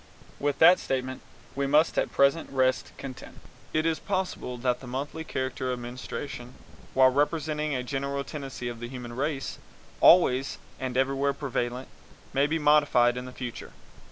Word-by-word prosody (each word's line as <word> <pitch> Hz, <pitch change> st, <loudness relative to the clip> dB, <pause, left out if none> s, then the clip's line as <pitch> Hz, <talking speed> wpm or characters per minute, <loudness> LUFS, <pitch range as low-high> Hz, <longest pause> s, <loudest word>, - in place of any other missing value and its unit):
With 145 Hz, 0 st, 0 dB
that 180 Hz, -, +7 dB
statement 130 Hz, -1 st, -3 dB, 0.3 s
we 140 Hz, 0 st, -1 dB
must 150 Hz, +3 st, +4 dB
at -, -, 0 dB
present 140 Hz, +4 st, +3 dB
rest 130 Hz, -1 st, +1 dB
content. 130 Hz, -2 st, -9 dB, 0.3 s
It 155 Hz, 0 st, +1 dB
is 165 Hz, -1 st, +1 dB
possible 185 Hz, -10 st, -3 dB
that 125 Hz, 0 st, 0 dB
the 130 Hz, -, -11 dB
monthly 140 Hz, +5 st, -4 dB
character 130 Hz, -3 st, -3 dB
of 125 Hz, -, -2 dB
menstruation, 125 Hz, +1 st, -7 dB, 0.4 s
while 130 Hz, 0 st, +6 dB
representing 150 Hz, +1 st, 0 dB
a 125 Hz, -, -2 dB
general 140 Hz, +1 st, -2 dB
tendency 135 Hz, -4 st, -6 dB
of 120 Hz, -1 st, -5 dB
the 120 Hz, -, -5 dB
human 125 Hz, -2 st, -7 dB
race, 140 Hz, +1 st, -2 dB, 0.4 s
always 135 Hz, -6 st, +5 dB, 0.2 s
and 130 Hz, -1 st, -3 dB
everywhere 135 Hz, +1 st, +1 dB
prevalent, 125 Hz, -2 st, -3 dB, 0.5 s
may 140 Hz, +1 st, +3 dB
be 160 Hz, +2 st, 0 dB
modified 145 Hz, -5 st, +4 dB
in 125 Hz, 0 st, -5 dB
the 125 Hz, -, -8 dB
future. 125 Hz, -2 st, -7 dB
135 Hz, 155 wpm, -27 LUFS, 125-145 Hz, 0.5 s, that